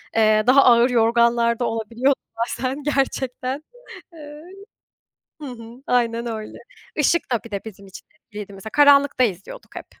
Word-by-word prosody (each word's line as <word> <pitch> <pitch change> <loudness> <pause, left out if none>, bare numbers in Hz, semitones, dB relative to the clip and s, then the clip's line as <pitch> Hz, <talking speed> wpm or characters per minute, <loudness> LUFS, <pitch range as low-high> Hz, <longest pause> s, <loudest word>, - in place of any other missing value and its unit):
eee, 215 -1 +3
daha 275 +2 +6
ağır 240 0 +5
yorganlarda 235 0 +2
olabiliyordu. 230 +5 -1 0.2
Bazen 255 +4 -3
gerçekten. 270 -1 -2 0.5
Evet. 300 -1 -12 1.0
Hı 290 - -6
hı, 240 +1 -11
aynen 235 -1 0
öyle. 220 -2 -6 0.4
Işık 305 -1 +1
da 235 - +1
bir 230 - -13
de 200 - -4
bizim 200 -2 -11
için 190 - -13 0.3
önemliydi 205 -1 -8
mesela. 195 +3 -9
Karanlıkta 285 -2 +4
izliyorduk 205 - -5
hep. - - -8
240 Hz, 140 wpm, -21 LUFS, 225-270 Hz, 1.0 s, daha